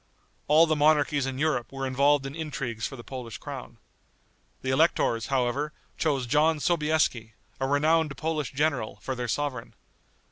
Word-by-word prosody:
All 155 Hz, +3 st, +6 dB
the 155 Hz, -1 st, +1 dB
monarchies 150 Hz, -2 st, +3 dB
in 130 Hz, -1 st, -4 dB
Europe 145 Hz, -5 st, 0 dB
were 135 Hz, 0 st, -4 dB
involved 140 Hz, +2 st, +3 dB
in 135 Hz, -, -5 dB
intrigues 140 Hz, -8 st, -4 dB
for 135 Hz, -, -9 dB
the 120 Hz, -, -10 dB
Polish 125 Hz, -4 st, -7 dB
crown. -, -, -8 dB, 0.9 s
The 130 Hz, -, 0 dB
electors, 130 Hz, -6 st, +2 dB
however, 135 Hz, +3 st, 0 dB, 0.2 s
chose 140 Hz, -5 st, 0 dB
John 150 Hz, +5 st, +3 dB
Sobieski, 150 Hz, -9 st, +1 dB, 0.3 s
a 135 Hz, -, 0 dB
renowned 150 Hz, +1 st, +2 dB
Polish 155 Hz, -3 st, -2 dB
general, 140 Hz, -5 st, -1 dB
for 135 Hz, -, -2 dB
their 125 Hz, -1 st, -4 dB
sovereign. 125 Hz, 0 st, -3 dB
140 Hz, 150 wpm, -27 LUFS, 130-155 Hz, 0.9 s, All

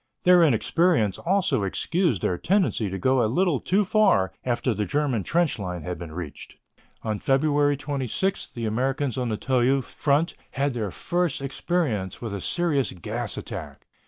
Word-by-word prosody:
Their 180 Hz, -1 st, +6 dB
inexperience 150 Hz, -, +2 dB
also 180 Hz, -, +1 dB
excused 145 Hz, -, 0 dB
their 90 Hz, -, +1 dB
tendency 180 Hz, -, +1 dB
to 95 Hz, -, -4 dB
go 130 Hz, +6 st, +2 dB
a 110 Hz, -, +1 dB
little 175 Hz, -1 st, +2 dB
too 200 Hz, +3 st, +1 dB
far 180 Hz, -, +3 dB
after 125 Hz, 0 st, 0 dB
the 105 Hz, 0 st, -1 dB
German 140 Hz, -2 st, 0 dB
trench 165 Hz, -, +1 dB
line 90 Hz, -4 st, -4 dB
had 90 Hz, +1 st, -5 dB
been 85 Hz, -3 st, -7 dB
reached. 80 Hz, -3 st, -8 dB, 0.5 s
On 110 Hz, -2 st, -2 dB
February 145 Hz, +1 st, +2 dB
26 145 Hz, -, -2 dB
the 115 Hz, -1 st, -6 dB
Americans 130 Hz, +4 st, -1 dB
on 125 Hz, -2 st, -1 dB
the 110 Hz, -, -1 dB
Toul 130 Hz, +2 st, +2 dB
front 145 Hz, +6 st, 0 dB, 0.2 s
had 140 Hz, 0 st, 0 dB
their 110 Hz, -4 st, -2 dB
first 175 Hz, -, -1 dB
experience 135 Hz, -, -2 dB
with 115 Hz, -4 st, -5 dB
a 100 Hz, -, -4 dB
serious 155 Hz, -, 0 dB
gas 110 Hz, +5 st, -5 dB
attack. 80 Hz, -, -7 dB
130 Hz, 160 wpm, -25 LUFS, 105-155 Hz, 0.5 s, Their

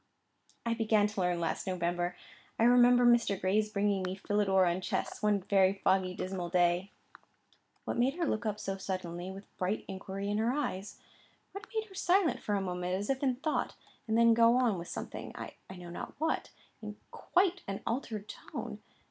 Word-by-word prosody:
"I 235 Hz, -, +1 dB
began 220 Hz, -2 st, +3 dB
to 210 Hz, -2 st, -2 dB
learn 180 Hz, -1 st, +1 dB
last 165 Hz, +2 st, -2 dB
November. 175 Hz, -1 st, -1 dB, 0.4 s
I -, -, +2 dB
remember 245 Hz, 0 st, +6 dB
Mr. 235 Hz, -5 st, +4 dB
Gray's 210 Hz, +3 st, +1 dB
bringing 200 Hz, -1 st, +1 dB
me 185 Hz, 0 st, -2 dB
'Philidor 195 Hz, -1 st, +2 dB
on 175 Hz, +1 st, 0 dB
Chess,' -, -, -3 dB
one 210 Hz, -2 st, +2 dB
very 195 Hz, -1 st, +4 dB
foggy, 190 Hz, -1 st, +1 dB
dismal 185 Hz, -2 st, -4 dB
day." 175 Hz, +1 st, +2 dB, 1.0 s
What -, -, -2 dB
made 260 Hz, +4 st, +2 dB
her 345 Hz, -1 st, 0 dB
look 215 Hz, -7 st, -1 dB
up 210 Hz, 0 st, -2 dB
so 195 Hz, -1 st, -3 dB
suddenly, 185 Hz, -2 st, -4 dB
with 195 Hz, +1 st, -11 dB
bright 185 Hz, +4 st, -1 dB
inquiry 195 Hz, +1 st, -4 dB
in 210 Hz, -, 0 dB
her 230 Hz, +3 st, +2 dB
eyes? 205 Hz, -9 st, -3 dB, 0.5 s
What 395 Hz, -, -8 dB
made 440 Hz, 0 st, 0 dB
her 405 Hz, -, -16 dB
silent 370 Hz, -1 st, +2 dB
for 205 Hz, -, -1 dB
a 200 Hz, -, 0 dB
moment 180 Hz, -1 st, -2 dB
as 200 Hz, +6 st, -1 dB
if 265 Hz, -, -2 dB
in 260 Hz, -3 st, +2 dB
thought, 300 Hz, +4 st, -2 dB, 0.3 s
and 220 Hz, 0 st, +1 dB
then 230 Hz, 0 st, +6 dB
go 230 Hz, +1 st, +5 dB
on 235 Hz, -7 st, +2 dB
with 170 Hz, -, -7 dB
something, -, -, -6 dB
I -, -, -7 dB, 0.2 s
know 180 Hz, -2 st, -9 dB
not -, -, -7 dB
what, 320 Hz, +2 st, -1 dB, 0.3 s
in 210 Hz, -1 st, -6 dB, 0.2 s
quite 365 Hz, 0 st, +1 dB
an 195 Hz, 0 st, -4 dB
altered 225 Hz, -3 st, -3 dB
tone? -, -, -7 dB
205 Hz, 185 wpm, -31 LUFS, 185-235 Hz, 1.0 s, remember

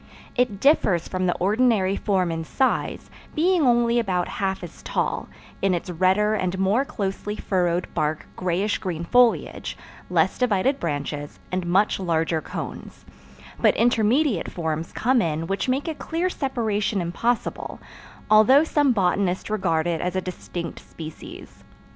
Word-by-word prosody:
It 245 Hz, -6 st, +1 dB
differs 205 Hz, -, +3 dB
from 185 Hz, 0 st, -1 dB
the 175 Hz, -, +1 dB
ordinary 205 Hz, -1 st, +2 dB
form 190 Hz, -5 st, 0 dB
in 165 Hz, 0 st, -3 dB
size, 260 Hz, -, -1 dB, 0.2 s
being 350 Hz, +2 st, +3 dB
only 240 Hz, -2 st, +3 dB
about 185 Hz, -6 st, 0 dB
half 195 Hz, -1 st, -2 dB
as 175 Hz, -, -10 dB
tall, -, -, -2 dB, 0.3 s
in 190 Hz, -2 st, +2 dB
its 175 Hz, +1 st, -4 dB
redder 190 Hz, +5 st, +2 dB
and 185 Hz, -3 st, -1 dB
more 195 Hz, +7 st, +2 dB
closely 205 Hz, -2 st, -3 dB
furrowed 180 Hz, -4 st, 0 dB
bark 155 Hz, +1 st, -1 dB
grayish 185 Hz, +3 st, 0 dB
green 170 Hz, -3 st, -4 dB
foliage, 245 Hz, +5 st, +2 dB, 0.3 s
less -, -, +1 dB
divided 250 Hz, +2 st, +2 dB
branches, 145 Hz, -2 st, -4 dB
and 185 Hz, -1 st, -2 dB
much 195 Hz, +4 st, +2 dB
larger 165 Hz, -3 st, 0 dB
cones; -, -, -7 dB, 0.5 s
but -, -, +3 dB
intermediate 235 Hz, -, +2 dB
forms 160 Hz, -1 st, -3 dB
come 250 Hz, +1 st, +2 dB
in 160 Hz, -2 st, -1 dB
which 195 Hz, +8 st, -2 dB
make 270 Hz, +4 st, 0 dB
a 320 Hz, -, -1 dB
clear 340 Hz, +4 st, -2 dB
separation 220 Hz, -, -1 dB
impossible, 215 Hz, +8 st, -2 dB, 0.5 s
although 215 Hz, +7 st, +6 dB
some 290 Hz, -4 st, +2 dB
botanists 190 Hz, -1 st, 0 dB
regard 175 Hz, -6 st, +1 dB
it 170 Hz, -2 st, -1 dB
as 180 Hz, +1 st, -2 dB
a -, -, +2 dB
distinct 175 Hz, -1 st, -6 dB
species. 160 Hz, -1 st, -11 dB
195 Hz, 140 wpm, -24 LUFS, 175-235 Hz, 0.5 s, although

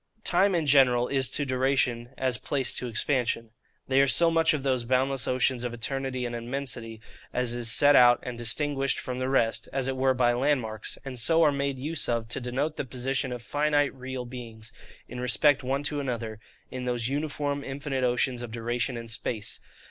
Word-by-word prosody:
Time 190 Hz, +2 st, +3 dB
in 165 Hz, -2 st, 0 dB
general 130 Hz, -4 st, +4 dB
is 135 Hz, -3 st, +1 dB
to 145 Hz, +2 st, -1 dB
duration 130 Hz, -2 st, 0 dB
as 130 Hz, -2 st, 0 dB
place 135 Hz, -3 st, 0 dB
to 125 Hz, -, -3 dB
expansion. 115 Hz, -1 st, -1 dB, 0.4 s
They 135 Hz, +1 st, +4 dB
are 140 Hz, -, +4 dB
so 165 Hz, +5 st, +4 dB
much 165 Hz, 0 st, +3 dB
of 150 Hz, -3 st, -2 dB
those 130 Hz, -3 st, +1 dB
boundless 130 Hz, 0 st, 0 dB
oceans 130 Hz, -1 st, +1 dB
of 120 Hz, -1 st, -3 dB
eternity 130 Hz, +1 st, -3 dB
and 120 Hz, 0 st, -4 dB
immensity 120 Hz, -2 st, -5 dB, 0.3 s
as 125 Hz, -1 st, 0 dB
is 120 Hz, -2 st, 0 dB
set 145 Hz, +4 st, +6 dB
out 120 Hz, -1 st, +7 dB
and 125 Hz, -1 st, -5 dB
distinguished 135 Hz, +4 st, 0 dB
from 125 Hz, 0 st, -4 dB
the 130 Hz, 0 st, -1 dB
rest, 115 Hz, -4 st, +1 dB
as 135 Hz, -1 st, -1 dB
it 135 Hz, -, -1 dB
were 130 Hz, 0 st, +2 dB
by 120 Hz, -1 st, +3 dB
landmarks; 120 Hz, -5 st, -1 dB
and 130 Hz, -2 st, -5 dB
so 165 Hz, +8 st, +4 dB
are 150 Hz, -, +5 dB
made 140 Hz, -1 st, -2 dB
use 150 Hz, +4 st, -1 dB
of 115 Hz, -2 st, -1 dB
to 120 Hz, -, -3 dB
denote 135 Hz, +5 st, -2 dB
the -, -, -1 dB
position 130 Hz, +1 st, -2 dB
of 120 Hz, -1 st, -6 dB
FINITE 145 Hz, 0 st, +1 dB
real 130 Hz, -1 st, -6 dB
beings, 115 Hz, -2 st, -9 dB, 0.4 s
in 125 Hz, -, -8 dB
respect 135 Hz, +4 st, +3 dB
one 135 Hz, +2 st, -2 dB
to 150 Hz, 0 st, -1 dB
another, 115 Hz, -5 st, -4 dB, 0.3 s
in 130 Hz, -1 st, -5 dB
those 120 Hz, -1 st, -1 dB
uniform 145 Hz, 0 st, -2 dB
infinite 135 Hz, -1 st, -3 dB
oceans 125 Hz, 0 st, +1 dB
of 120 Hz, -, -6 dB
duration 120 Hz, +2 st, -2 dB
and 115 Hz, -1 st, -5 dB
space. 115 Hz, -2 st, -4 dB
130 Hz, 195 wpm, -27 LUFS, 120-140 Hz, 0.4 s, out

